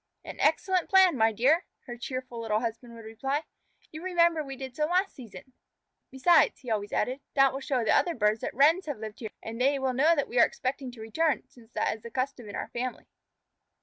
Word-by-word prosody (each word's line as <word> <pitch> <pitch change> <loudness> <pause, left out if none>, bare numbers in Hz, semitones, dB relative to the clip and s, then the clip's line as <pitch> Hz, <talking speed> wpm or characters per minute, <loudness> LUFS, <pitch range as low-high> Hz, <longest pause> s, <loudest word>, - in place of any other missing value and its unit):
"An - - -9
excellent 360 +3 +1
plan, 380 -3 +6
my 225 -2 +3
dear," 275 - +2
her 240 - -8
cheerful 255 -1 -6
little 215 -1 0
husband 230 0 -5
would 230 -1 -11
reply. 270 +7 -2 0.5
"You 315 - -8
remember 340 -3 +2
we 270 -1 -7
did 260 -1 -8
so 300 - +1
last 370 +4 +1
season. 255 +1 -12 0.6
Besides," 290 +6 +3
he 250 -4 -6
always 205 -2 -2
added, 255 +2 -1 0.2
"that 275 -1 +5
will 270 - -4
show 270 -2 -1
other 340 +10 +2
birds 215 -1 +1
that - - -4
Wrens 315 +7 +4
have 290 - -3
lived 215 -1 -8
here, 220 - -5
and 230 +2 -6
they 275 +2 +3
will 265 -1 -1
know 305 +7 +4
that 285 - -1
we 245 - 0
are 230 - +8
expecting 260 0 -4
to 230 - -11
return, 295 +7 0
since 235 -2 -20
that - - 0
is 220 - -15
the 235 - -9
custom 255 -2 -3
in 205 - -7
our - - -4
family." 250 +1 -4
260 Hz, 215 wpm, -28 LUFS, 230-300 Hz, 0.6 s, are